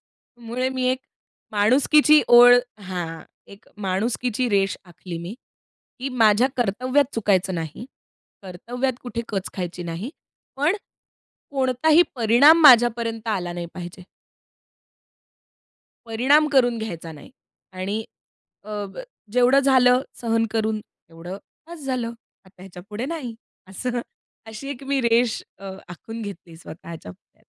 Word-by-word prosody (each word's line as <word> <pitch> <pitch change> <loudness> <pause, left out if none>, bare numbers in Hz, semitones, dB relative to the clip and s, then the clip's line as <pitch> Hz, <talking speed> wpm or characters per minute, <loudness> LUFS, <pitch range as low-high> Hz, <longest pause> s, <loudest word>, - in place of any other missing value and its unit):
त्यामुळे, 240 +2 -5
मी 260 -1 -3
एक 260 0 -2 0.5
माणुसकीची 285 +8 +5
ओळ 245 0 +9 0.3
हां. 175 -4 -5 0.3
एक 200 +2 -16 0.2
माणुसकीची 230 +5 -1
रेष 195 -2 +1
आखली 175 0 -9
मी, 175 +6 -7 0.6
की 265 +2 -3
माझ्या 235 0 +3
कर्तव्यात 255 +5 0
चुकायचं 195 -4 +1
नाही. 165 +7 -5 0.6
कर्तव्यात 245 +8 -3
कुठे 235 -1 -4
कच 195 -3 -3
खायची 180 -1 -5
नाही. 170 +9 -5 0.5
पण, 305 +9 +1 0.7
कोणताही 280 +5 +3
परिणाम 245 +8 +6
माझ्यापर्यंत 235 -3 +5
आला 180 -5 -2
नाही 175 -1 -5
पाहिजे. 180 +1 -8 2.0
परिणाम 265 +7 +3
करून 245 -3 +3
घ्यायचा 170 -7 -6
नाही. 150 - -14 0.4
आणि, 200 +4 -4 0.6
अ, 210 -1 -5 0.5
जेवढं 250 +3 +4
झालं 255 -2 +4 0.2
सहन 225 -1 +1
करून, 220 -1 -1
तेवढं 170 +2 -11 0.3
बस 335 -4 -10
झालं. 255 -3 -2 0.4
आता 185 -1 -19
ह्याच्या 180 -2 -11
पुढे 215 +5 -4
नाही, 275 -8 -5 0.3
असं 245 +6 -4 0.5
अशी 220 +6 -8
एक 275 -1 -7
मी 280 -1 +1
रेष 235 0 +2 0.2
अ, 195 -1 -8 0.2
आखून 225 +6 -9
घेतली 190 -5 -9
स्वतःच्या 165 - -10
पुढ्यात. - - -26
225 Hz, 120 wpm, -23 LUFS, 190-255 Hz, 2.0 s, ओळ